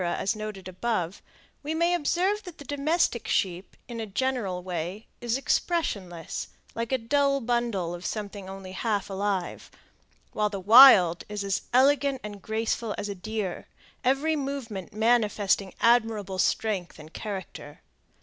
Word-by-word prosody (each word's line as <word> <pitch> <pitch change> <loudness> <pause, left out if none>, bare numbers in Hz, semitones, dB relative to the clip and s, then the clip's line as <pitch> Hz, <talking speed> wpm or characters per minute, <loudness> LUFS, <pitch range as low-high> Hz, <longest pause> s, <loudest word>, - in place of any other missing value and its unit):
as 175 +3 -1
noted 215 -3 -6
above, 185 -1 -2 0.4
we 305 +2 -3
may 340 +2 +2
observe 360 +5 +1
that 360 -5 -11
the 285 - -11
domestic 285 -3 0
sheep, 185 0 -1
in 235 -2 -6
a 225 - -3
general 205 -5 -2
way, 180 +4 -4
is 240 +1 -1
expressionless, 200 - -2 0.3
like 230 +1 -4
a 260 - +3
dull 275 +4 +2
bundle 235 -8 -1
of 175 0 -7
something 200 -2 -5
only 190 -1 -8
half 205 0 -2
alive, 195 -2 -2 0.6
while 210 -1 +1
the 200 -1 -5
wild 200 -5 +8
is 210 -1 -3
as 195 -1 -1
elegant 275 +1 +3
and 205 -1 -7
graceful 220 +1 -2
as 205 0 -4
a - - -2
deer, 200 -1 -4 0.4
every 275 +5 +2
movement 270 - -4
manifesting 210 -3 +2
admirable 220 -5 +2
strength 200 -5 0
and 155 +1 -13
character. 190 -8 -7
215 Hz, 140 wpm, -27 LUFS, 190-260 Hz, 0.6 s, wild